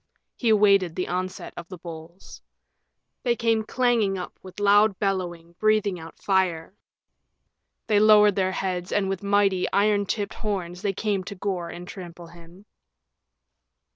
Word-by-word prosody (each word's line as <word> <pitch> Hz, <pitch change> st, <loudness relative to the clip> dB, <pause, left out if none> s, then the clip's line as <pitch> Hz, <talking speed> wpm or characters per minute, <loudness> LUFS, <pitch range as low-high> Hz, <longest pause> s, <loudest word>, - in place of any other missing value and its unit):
He 235 Hz, -, 0 dB
awaited 200 Hz, -5 st, +4 dB
the 180 Hz, -, -2 dB
onset 185 Hz, +1 st, -4 dB
of 170 Hz, -, -8 dB
the 185 Hz, -, -9 dB
bulls. 165 Hz, +1 st, -11 dB, 0.8 s
They 240 Hz, -2 st, +1 dB
came 230 Hz, -1 st, +1 dB
clanging 230 Hz, -5 st, +1 dB
up 180 Hz, -, -6 dB
with 185 Hz, +1 st, -11 dB
loud 205 Hz, 0 st, +4 dB
bellowing, 175 Hz, -4 st, -3 dB
breathing 215 Hz, -4 st, +2 dB
out 165 Hz, 0 st, -11 dB
fire. 185 Hz, -3 st, 0 dB, 1.1 s
They 210 Hz, -1 st, +3 dB
lowered 210 Hz, -1 st, +6 dB
their 190 Hz, -1 st, +1 dB
heads, 185 Hz, -2 st, -3 dB
and 195 Hz, -2 st, +1 dB
with 195 Hz, -2 st, -3 dB
mighty, 200 Hz, -2 st, +1 dB
iron 205 Hz, 0 st, +2 dB
tipped 205 Hz, 0 st, -2 dB
horns 180 Hz, -5 st, -4 dB
they 200 Hz, -2 st, -1 dB
came 200 Hz, -1 st, -1 dB
to 200 Hz, -, -7 dB
gore 180 Hz, -3 st, -3 dB
and 175 Hz, +1 st, -9 dB
trample 175 Hz, -3 st, -9 dB
him. 170 Hz, +3 st, -16 dB
195 Hz, 145 wpm, -25 LUFS, 180-205 Hz, 1.1 s, lowered